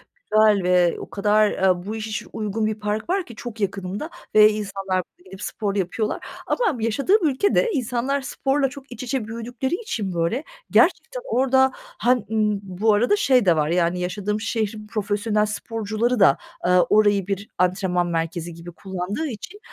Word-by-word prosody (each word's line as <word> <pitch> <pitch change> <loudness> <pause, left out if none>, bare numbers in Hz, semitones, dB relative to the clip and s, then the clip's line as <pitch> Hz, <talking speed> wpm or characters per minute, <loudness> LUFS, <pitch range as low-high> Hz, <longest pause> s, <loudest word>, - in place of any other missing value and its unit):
güzel 215 -2 +3
ve 180 -1 +3
o - - -8
kadar, 210 +1 +3
eee, 185 -1 +1
bu 215 - -4
işe 220 +1 -4
uygun 215 0 -2
bir 215 0 0
park 210 +5 -3
var 375 0 +1
ki 235 - -12
çok 240 -3 -8
yakınımda 200 - -3 0.3
ve 215 0 +8
insanlar 195 -3 -2
burada 180 - -29
gidip 190 +1 -11
spor 205 -2 -3
yapıyorlar. 205 +3 -2 0.2
Ama 370 - 0
yaşadığım 310 - +2
ülkede 405 - +2
insanlar 255 +1 -1
sporla 270 +1 0
çok 275 -1 -12
iç 245 - -7
içe 255 -3 -2
büyüdükleri 240 +5 -3
için 230 - -4
böyle, 170 - 0 0.3
gerçekten - - +3
orada, 265 - +3
han 245 +3 0 0.2
ııı, 210 -2 +1
bu 195 +3 +1
arada 240 - +3
şey 260 - +3
de 175 -3 +5
var 150 -1 +1
yani 175 +1 +1
yaşadığım 205 +4 -2
şehrin 215 -2 -2
profesyonel 210 0 0
sporcuları 220 +2 -2
da, 185 -8 +6 0.3
eee, 180 - +3
orayı 200 +2 +4
bir 200 +1 -3
antrenman 180 -1 +1
merkezi 165 0 -3
gibi 170 +1 -10
kullandığı 190 - -4
için, 290 - -8
215 Hz, 165 wpm, -23 LUFS, 190-245 Hz, 0.3 s, ve